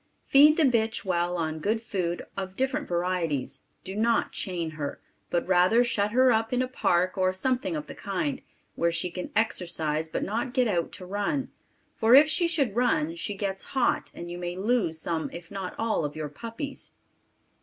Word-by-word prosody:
Feed 295 +3 +7
the 325 - +4
bitch 230 -5 +1
well 175 -1 0
on 160 -1 -2
good 220 +7 -1
food 180 -6 -2
of 190 -1 -5
different 265 +2 -1
varieties; 175 -6 -1 0.2
do 190 - -6
not 230 +2 +2
chain 170 -4 -2
her, 150 -2 -5 0.3
but 175 - 0
rather 185 +6 +5
shut 210 -4 0
her 255 +3 +4
up 225 0 +1
in 250 0 +2
a - - -2
park 185 -7 +1
of 185 0 +2
something 245 -4 0
of 150 - -4
the - - -9
kind, 260 +8 -3 0.3
where 170 0 +1
she 170 +1 -2
can 180 +1 -5
exercise 165 -7 0
but 160 - -3
not 235 +5 -2
get 250 -2 +3
out 175 -5 0
to 185 - -8
run, 205 +9 -2 0.4
for 225 +2 +5
if 295 +3 +8
she 340 +2 +2
should 280 -11 0
run 300 +6 +2
she 220 -11 -3
gets 195 -1 -3
hot 250 - +2
and 175 0 -7
you 175 - -6
may 175 0 -4
loose 190 -5 0
some 160 -1 -2
if 170 +1 -10
not 195 -2 -5
all 225 -7 0
of 145 0 -3
your 155 -1 -4
puppies. 230 - -7
195 Hz, 190 wpm, -27 LUFS, 175-240 Hz, 0.4 s, if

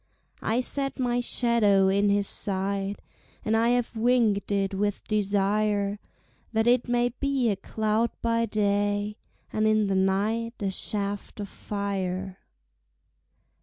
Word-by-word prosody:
I 230 +3 +1
set 275 +1 -2
my 245 -2 0
shadow 225 -6 +3
in 200 +1 +3
his 200 0 +2
sight 195 0 -1 0.5
And 215 - +2
I 230 +1 +3
have 245 -1 0
winged 225 -3 +2
it 195 -1 0
with 205 +1 -2
desire, 205 0 +1 0.5
That 220 0 +2
it 245 +1 +3
may 240 0 +2
be 265 -1 0
a - - 0
cloud 220 +3 0
by 230 0 +1
day, 205 0 0 0.4
And 215 0 +2
in 215 -1 +3
the 195 -1 0
night 210 +5 0
a 195 -2 -1
shaft 200 +1 -3
of 200 -1 -5
fire. 190 -2 -4
210 Hz, 130 wpm, -27 LUFS, 200-230 Hz, 0.5 s, shadow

